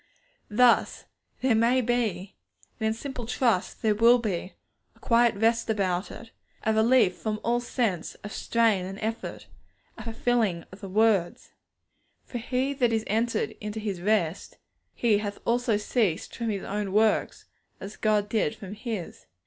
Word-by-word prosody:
Thus 240 +2 +3 0.4
there 260 -2 +3
may 235 +3 +3
be, 220 -6 -1 0.4
and 220 - 0
in 220 - +1
simple 250 -1 -6
trust 235 -6 0
there 215 -1 +3
will 230 +3 +6
be, 195 -6 -4 0.4
a - - -24
quiet 235 -2 +3
rest 225 +2 +1
about 190 -3 0
it, 225 0 -11 0.3
a 220 - +2
relief 220 -3 +4
from 215 -1 -3
all 240 +1 +1
sense 230 -8 -2
of 205 - -7
strain 225 -5 +1
and 190 +1 -6
effort, 225 +1 -4 0.5
a - - -7
fulfilling 225 -6 0
of 190 - -13
the 195 - -7
words, 205 -3 +1 0.7
'For 245 - -6
he 255 +4 -1
that 250 -4 +1
is 220 -1 0
entered 225 +1 0
into 210 +1 -4
his 200 -5 -4
rest, 190 -4 0 0.4
he 215 -4 +2 0.2
also 240 0 +1
hath 210 - 0
ceased 205 -11 0
from 235 -1 -3
his 200 -3 -3
own 200 -1 -3
works, 215 +1 +1 0.3
as 200 +2 -8
God 210 -1 +1
did 215 -8 0
from 195 -1 -9
His.' 215 -4 -6
220 Hz, 155 wpm, -27 LUFS, 200-235 Hz, 0.7 s, will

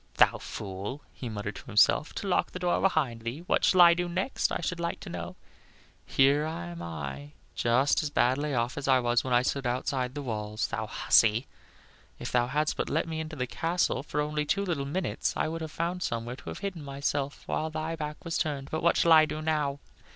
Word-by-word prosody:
"Thou - - +5
fool!" 100 +8 -6
he 125 - -6
muttered 105 -2 -5
to - - -11
himself, 120 +6 +4
"to 200 - -4
lock 180 - +2
the - - -4
door 180 -1 +1
behind 140 -11 +1
thee. 115 +7 -5
What - - +1
shall 185 - +5
I 170 -1 +9
do 175 0 -2
next, 185 +9 -1
I - - -1
should 175 +1 -3
like 170 0 -2
to - - -8
know? - - -6 0.7
Here 140 +2 +4
am 85 - -5
I 75 -4 -6 0.2
just 125 +4 +2
as 150 - -2
badly 145 +1 +1
off 120 +3 -1
as 140 - -5
I 130 -1 +5
was 120 -1 +2
when 130 - -4
I 120 0 +4
stood 135 0 -1
outside 125 +1 -1
the 145 - -4
walls. 110 -3 -2
Thou 110 -1 -3
hussy! 115 +2 +3 0.7
If - - -5
thou 120 -1 +2
hadst 150 +4 0
but - - -1
let 160 +2 0
me 160 -1 -3
into 160 0 -5
the 125 -3 -1
castle 165 +6 0
for 150 +1 -2
only 150 0 -1
two 200 +7 0
little 160 -7 -1
minutes, 180 +5 -2
I - - +1
would 165 +1 -4
have 160 - -4
found 175 +3 -2
somewhere 120 -3 -3
to - - -9
have - - -6
hidden 180 -6 -4
myself 140 0 -3
while 160 - -1
thy 160 +1 -3
back 150 0 -6
was 165 - -1
turned. 140 -2 -2
But 160 - -1
what 170 - +3
shall 170 - +4
I 155 -1 +8
do 155 - -5
now?" 150 -3 0
145 Hz, 220 wpm, -29 LUFS, 120-160 Hz, 0.7 s, I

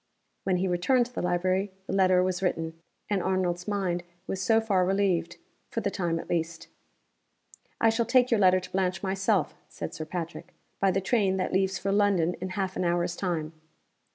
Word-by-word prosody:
When 185 -2 +2
he 190 +2 0
returned 210 +8 +2
to 245 - -13
the - - -3
library 185 +3 0
the - - -4
letter 185 -1 +4
was 185 -1 -1
written; 165 -3 -1 0.3
and 200 -3 0
Arnold's 180 -1 -1
mind 190 -4 -1 0.2
was 190 - -3
so 225 +3 +4
far 200 -5 +2
relieved 185 -3 +1 0.3
for - - -2
the - - -1
time 170 -4 -1
at - - -6
least. 165 0 -2 1.1
"I 225 - +4
shall 230 +1 0
take 250 -1 +4
your 230 - +4
letter 185 -1 +5
to 185 - -10
Blanche 185 +1 -1
myself," 190 -3 +1 0.2
said - - -6
Sir 155 - -5
Patrick, 170 0 -6 0.2
"by 195 - +3
the 195 +1 +1
train 195 -2 +2
that 185 - -2
leaves 190 0 +1
for 195 - -2
London 195 -4 +3
in 185 - -3
half 190 -1 -1
an - - -1
hour's 175 0 0
time." 165 -4 -2
185 Hz, 190 wpm, -28 LUFS, 175-195 Hz, 1.1 s, letter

